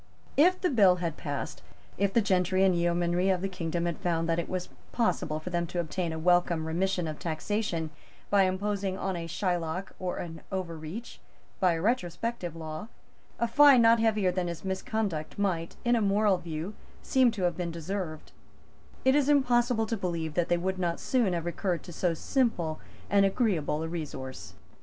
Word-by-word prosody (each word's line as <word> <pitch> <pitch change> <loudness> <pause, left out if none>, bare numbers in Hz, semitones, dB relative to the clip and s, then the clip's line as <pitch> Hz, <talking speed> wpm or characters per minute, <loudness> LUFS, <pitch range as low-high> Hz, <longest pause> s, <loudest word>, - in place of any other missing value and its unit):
If 360 +5 +5
the 360 - +1
bill 200 -8 +6
had 170 -3 -3
passed, 145 -3 -5 0.3
if 200 0 +1
the 230 +2 +3
gentry 185 -1 +2
and 190 -2 +4
yeomanry 175 +2 +1
of 185 -2 +2
the - - +1
kingdom 170 -2 -3
had 170 -2 -2
found 165 -2 0
that 165 0 +1
it 170 - -4
was 185 -1 -3 0.2
possible 155 -9 0
for 180 +4 -7
them 170 -1 0
to 175 - -3
obtain 170 +1 -2
a 160 - -4
welcome 175 -1 +2
remission 180 +2 0
of 155 -1 -5
taxation 165 -1 -2 0.4
by 200 -1 +5
imposing 195 0 -1
on 190 -1 -2
a 165 -1 -4
Shylock 175 0 -2
or 180 -1 -3
an 165 -2 -6
Overreach, 180 +3 -5 0.4
by 180 -2 +4
a 165 - -2
retrospective 195 -3 -1
law, 155 +3 -6 0.5
a 235 - +1
fine 270 0 +7
not 230 0 +6
heavier 215 -4 +2
than 180 -1 -1
his 170 +2 -6
misconduct 190 -4 -2
might, 180 -5 -1
in 240 0 +4
a 230 - +2
moral 205 -1 +3
view, 165 +4 -5 0.3
seem 260 -2 +4
to 210 -5 -4
have 175 -2 +1
deserved, 165 -1 -5 0.7
it 265 - +6
is 290 0 +3
impossible 240 -5 +3
to 225 - -2
believe 170 -5 -3
that 175 0 0
they 175 - +3
would 185 +2 -2
not 170 -2 -1
soon 235 -8 +1
have 170 -1 -2
recurred 175 0 -2
to 175 - -10
so 170 0 0
simple 175 - 0 0.3
and 200 -1 +4
agreeable 190 - +1
a - - -2
resource. 130 - -6
180 Hz, 180 wpm, -29 LUFS, 165-205 Hz, 0.7 s, fine